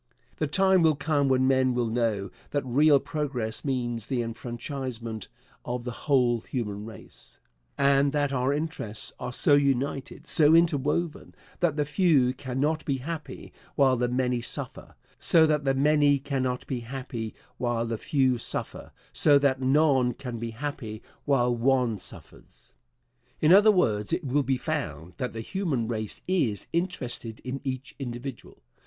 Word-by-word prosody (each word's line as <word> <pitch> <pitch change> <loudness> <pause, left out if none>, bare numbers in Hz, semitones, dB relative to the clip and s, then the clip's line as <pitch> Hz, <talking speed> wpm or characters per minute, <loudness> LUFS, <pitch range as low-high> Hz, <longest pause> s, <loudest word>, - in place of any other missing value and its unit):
The 155 - 0
time 190 +4 +3
will 160 -2 +4
come 145 -2 +1
when 130 0 +3
men 130 -1 +3
will 120 -1 +1
know 110 -4 -1 0.2
that 145 -2 -2
real 140 +3 +4
progress 140 -7 -3
means 120 -5 -2
the 125 -3 -1
enfranchisement 120 -1 -5 0.4
of 125 0 -4
the 125 - -4 0.2
whole 125 -4 +3
human 105 -4 -4
race, 115 - -12 0.4
and 140 0 +3
that 145 -1 0
our 130 +1 +1
interests 145 -8 -3
are 125 0 -4
so 145 - +3
united, 140 -1 0
so 155 0 +6
interwoven, 165 0 +1 0.2
that 175 -5 +1
the 150 -1 0
few 145 -5 +3
cannot 140 +4 -2
be 140 -2 -1
happy 155 +4 -7 0.2
while 135 -3 +4
the 125 0 0
many 125 -1 0
suffer; 120 - -7 0.2
so 160 -1 +4
that 150 -2 +1
the 135 0 +2
many 145 0 +4
cannot 130 -2 -2
be 130 - -3
happy 120 -2 -6 0.2
while 120 -1 -1
the 115 -1 -3
few 130 -4 +1
suffer; - - -5 0.2
so 145 -2 +5
that 135 -2 +1
none 130 -3 +3
can 125 -4 -6
be 115 0 -4
happy 115 -3 -6 0.2
while 125 -4 +2
one 120 -3 +1
suffers. - - -13 0.7
In 155 +3 +5
other 205 +3 +7
words, 110 - +1
it 175 +1 -1
will 140 +1 +1
be 135 -1 0
found 90 - -4
that 125 - -3
the 115 - -5
human 145 - -2
race 110 -3 -4
is 140 - 0
interested 125 - -1
in 130 +2 -5
each 135 -1 -5
individual. 120 - -7
130 Hz, 155 wpm, -27 LUFS, 120-145 Hz, 0.7 s, other